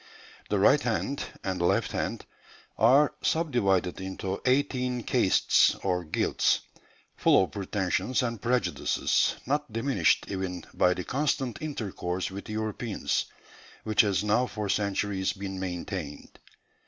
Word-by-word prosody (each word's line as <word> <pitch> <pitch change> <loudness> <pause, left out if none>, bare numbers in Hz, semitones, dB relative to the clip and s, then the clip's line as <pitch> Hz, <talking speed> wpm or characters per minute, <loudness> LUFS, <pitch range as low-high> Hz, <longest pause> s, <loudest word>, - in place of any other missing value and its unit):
The - - +1
'right - - +5
hand' 140 - -1 0.2
and 95 -2 -2
'left 85 - +1
hand' - - -3 0.5
are 135 +6 +5
subdivided 100 - +1
into 95 0 -4
eighteen 125 -2 +1
castes - - +3
or 90 -2 0
guilds, 80 - +1 0.5
full - - +4
of - - -5
pretensions 100 +5 -1
and 115 -4 -3
prejudices, 125 +1 +1
not 145 0 -1
diminished 115 - +2
even 95 -2 -4
by 90 0 +3
the 90 - -4
constant 135 -2 -1
intercourse 95 - -3
with 100 +3 -8
Europeans 110 0 -2 0.6
which 110 -1 +4
has 100 -2 +1
now 115 +4 +2
for 105 -3 -4
centuries 100 -1 0
been 95 -1 -6
maintained. 90 -4 -6
105 Hz, 120 wpm, -28 LUFS, 95-125 Hz, 0.6 s, right